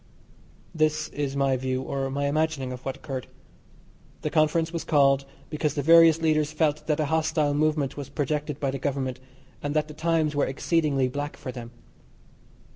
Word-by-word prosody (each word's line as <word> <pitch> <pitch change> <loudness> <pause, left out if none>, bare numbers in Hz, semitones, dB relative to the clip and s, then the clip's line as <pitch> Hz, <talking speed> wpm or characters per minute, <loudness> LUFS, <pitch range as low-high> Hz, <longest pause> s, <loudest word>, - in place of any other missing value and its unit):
This 155 -1 +1
is 140 -2 -3
my 135 -1 +2
view, 130 0 -2
or 135 0 -2
my 140 +1 -2
imagining, 145 -3 0
of 125 0 -8
what 135 0 -4
occurred. 135 -2 -6 1.0
The - - -1
conference 160 +2 +2
was 165 - -3
called 135 -2 +3 0.3
because 150 -1 -1
the 145 - -1
various 165 +1 +6
leaders 155 -1 +2
felt 155 -1 0
that 155 -1 +1
a 155 - +2
hostile 155 -1 +1
movement 150 -2 0
was 140 -2 -6
projected 150 0 -2
by 140 -2 0
the 135 - -4
Government, 135 -3 -2 0.4
and 145 +1 -3
that 155 0 +1
the 150 - -9
times 160 -1 0
were 145 - +2
exceedingly 140 -1 +1
black 145 +3 -4
for 130 - -6
them. 120 -2 -8
145 Hz, 175 wpm, -26 LUFS, 135-155 Hz, 1.0 s, various